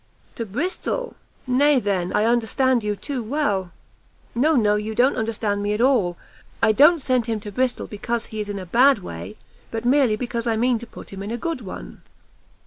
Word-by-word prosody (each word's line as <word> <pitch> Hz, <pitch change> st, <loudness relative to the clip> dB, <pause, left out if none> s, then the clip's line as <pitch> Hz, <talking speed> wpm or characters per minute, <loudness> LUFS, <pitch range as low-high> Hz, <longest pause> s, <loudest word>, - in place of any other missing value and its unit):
"To 230 Hz, -, -5 dB
Bristol! 365 Hz, -, -3 dB, 0.3 s
nay 275 Hz, +2 st, +4 dB
then, 190 Hz, -5 st, -1 dB
I 210 Hz, -, +2 dB
understand 240 Hz, +1 st, +2 dB
you 210 Hz, 0 st, -1 dB
too 260 Hz, +6 st, -4 dB
well!" 215 Hz, -8 st, -1 dB, 0.6 s
"No, 300 Hz, +7 st, +3 dB
no, 210 Hz, -4 st, +3 dB
you 215 Hz, +1 st, -3 dB
don't 255 Hz, +4 st, +3 dB
understand 215 Hz, -2 st, -1 dB
me 205 Hz, +1 st, 0 dB
at 210 Hz, -, -2 dB
all; 225 Hz, -10 st, +2 dB, 0.4 s
I 225 Hz, -, +4 dB
don't 295 Hz, +6 st, +5 dB
send 250 Hz, -3 st, +1 dB
him 225 Hz, -2 st, -1 dB
to 205 Hz, -, -7 dB
Bristol 255 Hz, +4 st, -1 dB
because 230 Hz, +3 st, -3 dB
he 220 Hz, -2 st, -5 dB
is 205 Hz, -, -6 dB
in 205 Hz, -, -3 dB
a 190 Hz, -, -6 dB
bad 250 Hz, +9 st, +5 dB
way, 85 Hz, -, -8 dB, 0.3 s
but 225 Hz, +1 st, -4 dB
merely 255 Hz, -3 st, +4 dB
because 235 Hz, 0 st, -3 dB
I 225 Hz, -, +2 dB
mean 240 Hz, +1 st, +2 dB
to 240 Hz, -, -10 dB
put -, -, -12 dB
him 195 Hz, -, -7 dB
in 200 Hz, -, -5 dB
a 235 Hz, -, -2 dB
good 325 Hz, +1 st, -3 dB
one." -, -, -9 dB
230 Hz, 200 wpm, -23 LUFS, 205-255 Hz, 0.6 s, don't